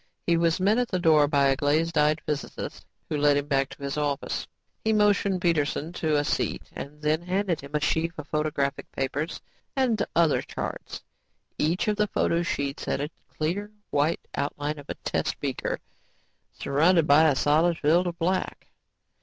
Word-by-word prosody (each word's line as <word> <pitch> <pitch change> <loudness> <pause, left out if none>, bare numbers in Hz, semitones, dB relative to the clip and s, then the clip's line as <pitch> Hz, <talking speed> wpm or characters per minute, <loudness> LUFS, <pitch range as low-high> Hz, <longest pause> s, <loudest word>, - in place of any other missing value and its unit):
He 170 - +3
was 165 0 +2
met 205 +5 +3
at 245 - +1
the 185 - -1
door 155 -4 +5
by 140 -1 +3
a 135 - +3
glazed 155 +4 +1
eyed 150 0 +3
physicist 150 -2 -5 0.2
who 150 - -2
led 145 0 +4
him 145 - -1
back 135 -1 +1
to 140 - -11
his 140 +2 -2
office. 145 -2 -2 0.4
He 220 - +2
motioned 205 -3 +3
Peterson 160 -1 0
to 155 -4 +1
a 145 - +2
seat - - -1
and 150 +2 -8
then 155 +2 +2
handed 185 0 -1
him 140 +2 -8
a - - +3
sheaf 165 +3 0
of 150 -1 -7
photographic 150 -2 -1
papers 145 +4 -2 0.3
and 245 -6 +2
other 165 -3 +4
charts. - - -6 0.6
Each 170 +8 +1
of 210 -1 +1
the 210 -1 +2
photo 170 -3 +1
sheets 140 -5 -2
had - - -1
a 145 +3 -3 0.2
clear, 180 +7 -2 0.2
white 150 +3 0
outline 145 +1 -2
of 145 - -13
a - - -3
test - - -2
beaker - - -2 0.7
surrounded 165 +4 +3
by 155 +2 +6
a 140 - +2
solid 160 +5 +3
field 170 +5 +3
of 170 -1 -4
black. 185 +3 -2
155 Hz, 180 wpm, -26 LUFS, 145-175 Hz, 0.7 s, by